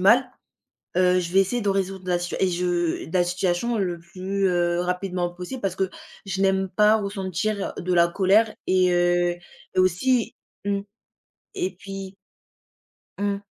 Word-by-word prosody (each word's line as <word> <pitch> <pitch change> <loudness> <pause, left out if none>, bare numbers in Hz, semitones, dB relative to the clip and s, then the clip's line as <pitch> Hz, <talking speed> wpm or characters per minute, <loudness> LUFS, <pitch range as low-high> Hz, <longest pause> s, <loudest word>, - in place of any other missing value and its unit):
mal, 245 +7 +5 0.7
heu, 180 0 +4
je 170 - -4
vais 195 - +6
essayer 240 +6 0
de 205 - 0
résoudre 190 -1 -2
la 175 -1 +2
situa 175 0 -4
et 190 - +4
je 175 -2 -1
la 180 - +4
situation 180 +6 0
le 180 -3 -1
plus, 190 +3 -2
heu, 175 -1 +1
rapidement 180 0 -1
possible 180 +9 -6
parce 190 -2 -1
que 190 -1 0 0.4
je 195 0 -3
n'aime 190 0 +2
pas 210 +2 +5
ressentir 200 0 -2
de 180 0 -2
la 170 0 +5
colère 200 +5 +3
et 185 -1 +3
heu, 175 0 +2 0.4
et - - -2
aussi 225 +7 +2 0.3
mmh 200 0 +1 0.8
et 185 - -1
puis 195 0 -8 1.0
Mmh. 200 0 -1
185 Hz, 155 wpm, -24 LUFS, 175-200 Hz, 1.0 s, vais